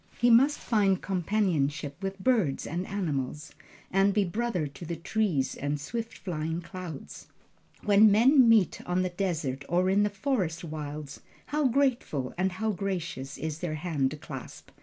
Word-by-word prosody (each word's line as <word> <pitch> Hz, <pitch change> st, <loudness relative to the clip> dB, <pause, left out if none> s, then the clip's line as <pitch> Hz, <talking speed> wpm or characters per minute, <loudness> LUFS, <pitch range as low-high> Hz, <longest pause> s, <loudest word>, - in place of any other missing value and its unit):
He 240 Hz, 0 st, +4 dB
must 270 Hz, +6 st, +5 dB
find 200 Hz, -5 st, +2 dB
companionship 165 Hz, -7 st, 0 dB
with 195 Hz, 0 st, -3 dB
birds 200 Hz, -, +1 dB
and 175 Hz, +4 st, -3 dB
animals, 150 Hz, -6 st, -3 dB, 0.4 s
and 195 Hz, +1 st, +3 dB
be 205 Hz, -, +4 dB
brother 205 Hz, -2 st, -1 dB
to 145 Hz, +4 st, -9 dB
the 170 Hz, 0 st, -4 dB
trees 165 Hz, -6 st, 0 dB
and 145 Hz, +1 st, -2 dB
swift 230 Hz, +9 st, -5 dB
flying 165 Hz, -2 st, -3 dB
clouds. 175 Hz, -4 st, -8 dB, 0.6 s
When 210 Hz, +1 st, +6 dB
men 245 Hz, +4 st, +6 dB
meet 215 Hz, -6 st, +4 dB
on 180 Hz, +1 st, +1 dB
the 185 Hz, -, -1 dB
desert 165 Hz, -8 st, -2 dB
or 180 Hz, +2 st, +2 dB
in 200 Hz, +1 st, +4 dB
the 205 Hz, -, +2 dB
forest 195 Hz, -, -1 dB
wilds, 150 Hz, -2 st, -6 dB, 0.3 s
how 300 Hz, -1 st, +1 dB
grateful 240 Hz, -, 0 dB
and 185 Hz, +1 st, 0 dB
how 220 Hz, +4 st, -1 dB
gracious 170 Hz, -9 st, -4 dB
is 155 Hz, 0 st, -4 dB
their 160 Hz, -3 st, -3 dB
hand 150 Hz, -3 st, -1 dB
clasp! -, -, -9 dB
180 Hz, 155 wpm, -28 LUFS, 155-210 Hz, 0.6 s, When